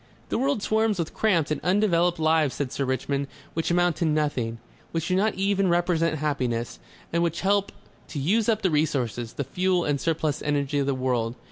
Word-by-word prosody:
"The - - 0
world 270 -5 0
swarms 220 -1 +1
with 170 -2 -3
cramped 170 -9 +1
and 155 - -1
undeveloped 180 -2 +2
lives," 155 -3 +2
said 140 -3 -3
Sir 140 - -1
Richmond. 140 +2 -1 0.3
"Which 165 - -1
amount 175 -2 +2
to 170 - 0
nothing. 145 -7 0 0.4
Which 165 +1 -2
do 185 - +2
not 210 +3 +2
even 195 0 +1
represent 170 -2 +1
happiness. 125 -6 -2 0.3
And 170 - +2
which 170 0 -1
help 200 +1 +2 0.4
to 160 - -7
use 205 +11 +2
up 220 -2 +1
the 185 - +2
resources, 130 -7 -1
the 140 - -2
fuel 180 +3 0
and 145 -2 0
surplus 155 -3 0
energy 145 -1 0
of 140 - 0
the 140 - +1
world." 125 -3 -1
160 Hz, 195 wpm, -25 LUFS, 140-185 Hz, 0.4 s, undeveloped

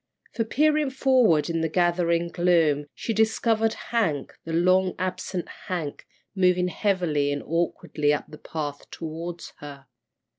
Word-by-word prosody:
For 225 - 0
peering 300 +4 +2
forward 255 - +3
in 165 -1 -1
the 160 - 0
gathering 170 0 +1
gloom, 165 -5 +2
she 225 - -3
discovered 220 0 +2 0.2
Hank, 170 - 0
the 165 - -5
long 185 +3 +3
absent 185 -1 -3 0.2
Hank, 165 -6 -4 0.3
moving 180 -1 +3
heavily 170 -6 0
and 145 0 -3
awkwardly 165 -3 0
up 150 - -1
the 150 - -12
path 145 -3 -5
toward 165 +2 -6
her. 140 -2 -10
175 Hz, 135 wpm, -25 LUFS, 155-195 Hz, 0.3 s, forward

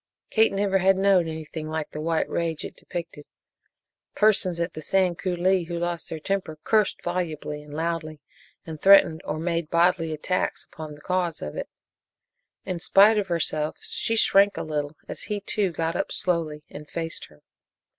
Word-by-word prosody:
Kate 220 0 +4
never 195 -1 +1
had 190 +1 +4
known 190 -3 +4
anything 160 0 -6
like 155 -1 -3
the 150 - -5
white 165 0 0
rage 165 -2 -2
it - - -8
depicted. 170 -4 -7 0.9
Persons 195 -5 +3
at 170 +1 -2
the 155 - -7
Sand 180 +1 +1
Coulee 180 0 +1
who 170 0 -4
lost 175 -1 -3
their 160 - -5
temper 185 -2 -2
cursed 215 -3 +1
volubly 160 -4 -3
and 150 0 -14
loudly, 160 0 -3 0.5
and 160 -2 -8
threatened 190 -5 +6
or 155 - -2
made 165 -1 -2
bodily 170 -1 +2
attacks 170 +4 -2
upon 155 -2 -9
the 145 - -16
cause 180 -2 -1
of 75 - -6
it. - - -5 1.0
In 185 -3 -3
spite 205 +5 +5
of 200 - -2
herself 155 -3 -1
she 225 - -1
shrank 200 -2 +5
a - - -2
little 150 -1 -3
as - - -6
he, 210 -1 -1
too, 200 -1 0
got 165 0 -2
up - - -2
slowly 160 -4 -1
and 150 +1 -11
faced 165 -1 -4
her. 75 -1 -22
170 Hz, 175 wpm, -25 LUFS, 155-185 Hz, 1.0 s, threatened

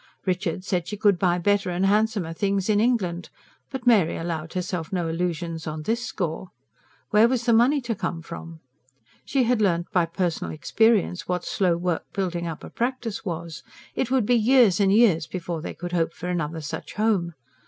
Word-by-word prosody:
Richard 185 -1 -1
said 180 -3 -1
she 210 - -5
could 200 -4 +3
buy 175 -2 +2
better 200 +2 +1
and 180 +2 0
handsomer 205 -4 +1
things 195 +3 0
in 205 - +3
England; 200 -7 0 0.4
but 265 -2 -6
Mary 210 -9 +4
allowed 165 -1 -4
herself 180 -3 -3
no 175 -3 -1
illusions 165 -1 -3
on 155 0 -4
this 230 +7 -1
score. 180 -4 -4 0.6
Where 215 +2 +6
was 245 -1 -1
the 235 - +4
money 255 +6 +4
to 240 -2 -2
come 170 -5 -4
from? 165 0 -9 0.6
She 270 -2 +1
had 240 -1 +2
learnt 175 -4 +1
by 175 -2 +2
personal 170 -1 -2
experience 200 +4 +1
what 180 -1 -2
slow 180 -4 +1
work 175 -1 -1
building 175 -3 -2
up 160 -2 -6
a - - -9
practice 240 -3 -3
was. 170 -4 -5 0.3
It 250 - -1
would 260 -4 +2
be 245 - +3
years 235 -4 +5
and 195 -1 +4
years 200 -7 +4
before 170 -3 -4
they - - -6
could 175 +1 -6
hope 170 -2 0
for 180 - -5
another 165 -2 -2
such 145 - -6
home. 195 -6 +1
185 Hz, 185 wpm, -25 LUFS, 170-220 Hz, 0.6 s, Where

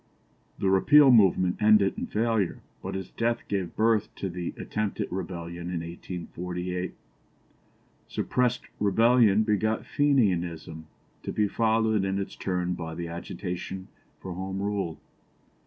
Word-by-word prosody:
The 95 - +1
Repeal 140 +8 +7
movement 95 -4 +4
ended 105 -2 +5
in - - -4
failure, 110 -4 0 0.2
but - - -5
its 95 -2 -5
death 115 0 -1
gave 95 -4 -2
birth 110 -1 +2
to 95 - -3
the 85 0 -4
attempted 105 -2 -2
rebellion 85 -2 -5
in 90 -2 -2
1848. 90 +1 -5 1.1
Suppressed 125 -1 0 0.2
rebellion 110 +1 +4
begot 110 +1 0
Fenianism, 90 - 0 0.3
to - - -4
be 105 -1 +1
followed 110 -1 +2
in 95 0 -1
its 100 - -4
turn 90 -1 -1
by 80 -2 -6
the 85 0 -5
agitation 90 +2 -6 0.3
for 95 - -6
Home 95 +2 -4
Rule. 100 -5 -2
95 Hz, 125 wpm, -27 LUFS, 90-110 Hz, 1.1 s, Repeal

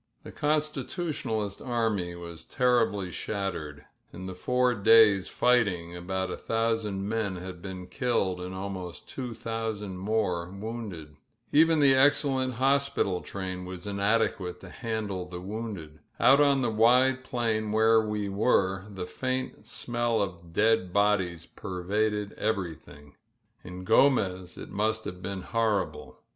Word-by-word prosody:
The - - -9
Constitutionalist 150 - -2
army 110 -8 -1
was 85 -1 -9
terriUy 115 -7 +1
shattered, 80 -9 -4 0.3
the 95 +1 -7
four 125 +6 +1
days' 105 -2 +6
fighting 95 -9 +1
about 95 +1 -3
a - - -2
thousand 115 -3 -1
men 110 -3 -1
had 90 0 -7
I - - -5
IdDed 95 0 -1
and 90 +1 -5
afanost 95 -2 -6
two 125 -4 -6
thousand 110 -5 -4
more 95 -4 0
wounded. 100 -6 -7 0.3
E 150 +2 +7
the 155 -4 +5
excellent 130 -2 +3
hospital 135 -7 +1
train 95 -2 -5
was 90 0 -8
inadeqoate 100 -2 0
to 95 - -11
hai 115 -3 -3 0.3
the 90 -1 -6
wounded. 95 -6 -6 0.2
Oot 140 +2 +6
on 140 -2 +4
the 120 - +1
wide 125 +4 +4
plain 115 -4 -1
where 110 +1 +5
we 105 -1 -2
were 95 -2 +1 0.2
faint 130 +5 -3
smell 120 -1 -1
of 85 -4 -4
dead 105 -1 +2
bodies 95 -4 +1
perraded 105 +2 -2
ererythi 80 -8 -4 0.5
In 90 0 -8
Gromez 95 -7 +2
it - - -9
must 110 +2 0
ha^e 90 0 -6
been 95 0 -4
horrible. 110 -3 -1
105 Hz, 130 wpm, -28 LUFS, 90-115 Hz, 0.5 s, E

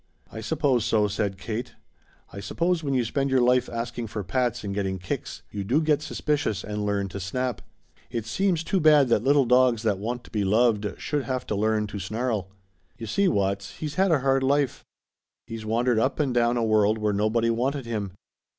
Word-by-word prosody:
"I 110 - -7
suppose 130 -1 +1
so," 105 -1 +2
said 100 -1 -2
Kate. 110 +4 -5 0.6
"I 100 - -6
suppose 170 - -1
when 140 -2 -1
you 125 -2 +1
spend 135 +4 -1
your 130 -1 +3
life 125 +1 +3
asking 120 0 -4
for 105 -1 -5
pats 120 +5 -1
and 100 -1 -3
getting 95 -1 -2
kicks 95 0 -5
you 100 -1 -4
do 125 +10 +2
get 150 -2 +2
suspicious 150 - -1
and 105 0 -4
learn 100 -1 0
to 100 - -6
snap. 125 +7 -3 0.5
It 115 -3 -4
seems 175 - 0
too 190 - 0
bad 150 -5 +5
that 110 -2 +2
little 140 0 +4
dogs 125 -2 +3
that 105 -4 +1
want 120 +4 -4
to - - -16
be 105 -2 0
loved 105 0 +1
should 145 -2 -2
have 130 -1 -3
to 105 - -2
learn 110 +1 +1
to 105 -1 -6
snarl. 110 0 -2 0.5
You 115 - -6
see, 195 - +1
Watts, 100 - -1
he's 150 -2 -4
had 190 +4 +2
a 155 -5 +3
hard 135 0 +2
life. 140 0 +1 0.6
He's 110 -1 -7
wandered 120 +1 +2
up 130 +6 0
and 140 -4 +1
down 120 0 +2
a 115 - +1
world 110 -1 +3
where 105 -1 0
nobody 110 +3 +1
wanted 130 +3 -1
him. 105 -5 -3
115 Hz, 205 wpm, -25 LUFS, 105-135 Hz, 0.6 s, bad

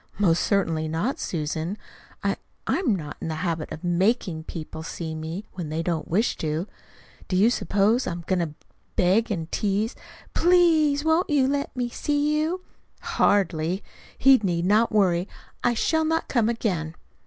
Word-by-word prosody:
"Most 175 -5 +3
certainly 165 -6 +1
not, 165 - -1
Susan! 160 +3 -3 0.5
I - - 0 0.3
I - - +1
am 265 - +1
not 150 -5 -6
in - - -3
the 160 +2 -3
habit 165 -2 -2
of 160 - -7
MAKING 180 -1 +1
people 160 -1 -7
see 160 0 -5
me, 160 +6 -5
when 175 -5 -5
they 160 +2 -2
don't 165 -2 -2
wish 210 +8 +1
to. 155 +2 -2 0.6
Do 185 - -1
you 210 +6 +5
suppose 215 +2 +2
I'm 170 0 -4
going 185 0 +1
to 160 -3 -2 0.4
beg 195 +6 +3
and 165 -6 -3
tease: 210 +3 0 0.4
'PLEASE 320 -4 +4
won't 320 +3 +2
you 280 -3 +3
let 280 0 -2
me 245 -1 -1
see 290 +4 0
you?' 335 +4 -1 0.4
Hardly! 185 -2 +1 0.3
He 270 0 +7
need 175 -4 0
not 215 +4 +3
worry. 185 -4 +2 0.4
I 240 - +2
shall 320 +7 +2
not 325 +1 0
come 230 -3 +2
again." 180 -9 -2
195 Hz, 165 wpm, -25 LUFS, 165-245 Hz, 0.6 s, He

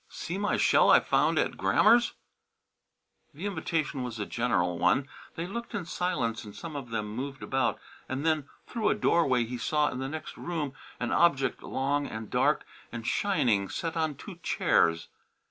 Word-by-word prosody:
"See 180 +3 -5
my 205 - +1
shell - - +5
I - - +8
found - - +2
at - - +1
Grammer's!" 240 +1 +4 1.2
The 170 +7 -6
invitation 160 -8 -2
was 125 -2 -4
a 105 - -2
general 90 -9 0
one. 110 +11 +3 0.3
They 165 - -3
looked 235 +6 -6
in 195 -4 -3
silence 145 -11 -1
and 105 -2 -11
some 165 -3 -7
of 135 -4 -6
them 110 -2 -2
moved 135 +6 -5
about, 135 -2 0 0.3
and 135 +4 -3
then 155 -3 +1 0.2
through 225 -3 0
a - - +2
doorway 150 - +3
he 120 +1 -5
saw 150 +4 +2
in 125 - -5
the 135 0 -3
next 155 +2 -7
room 155 -6 -3 0.3
an 120 - -2
object 140 -6 +3
long 140 +2 -1
and 110 -1 -7
dark - - +2 0.3
and 115 -1 -6
shining 120 - +1
set 165 -1 -3
on 160 -3 0
two 180 +4 -10
chairs. 85 - +2
140 Hz, 175 wpm, -29 LUFS, 120-170 Hz, 1.2 s, I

